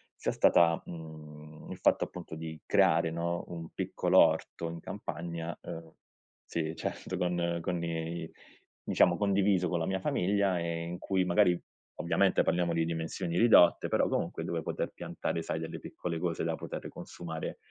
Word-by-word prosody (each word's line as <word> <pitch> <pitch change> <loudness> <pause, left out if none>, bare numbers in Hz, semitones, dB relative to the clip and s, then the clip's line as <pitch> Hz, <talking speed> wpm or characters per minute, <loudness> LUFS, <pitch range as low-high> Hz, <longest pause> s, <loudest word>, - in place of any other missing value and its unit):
sia - - -1
stata, 85 -1 +4
mhmm, 75 -2 -10
il - - -6
fatto, - - +3
appunto, 80 - -8
di 80 -1 -7
creare, 80 - +4
no, 85 +1 -2
un 85 -2 -6
piccolo - - +2
orto 85 -1 +2
in 85 0 -6
campagna, 85 +1 -5
ehm 80 0 -8 0.5
sì, 80 0 -3
certo, 95 - -4
con 85 -1 0
con 90 -2 -1
i 80 0 -3 0.5
diciamo, 85 - +3
condiviso 100 -3 +2
con 85 - 0
la 80 - -1
mia 95 0 0
famiglia 95 0 +1
e 85 0 -2
in 85 +1 -5
cui 95 -1 0
magari 90 0 +4 0.4
ovviamente - - +2
parliamo 85 -1 +1
di 80 0 +1
dimensioni 85 +1 -3
ridotte, 110 -7 +6
però - - +2
comunque - - -2
dove - - -2
poter - - -3
piantare, 85 - -3
sai, 80 - -3
delle 80 - -5
piccole 85 -2 -5
cose 85 -1 -1
da - - 0
potere - - -6
consumare, 80 -2 -6
85 Hz, 160 wpm, -31 LUFS, 80-90 Hz, 0.5 s, ridotte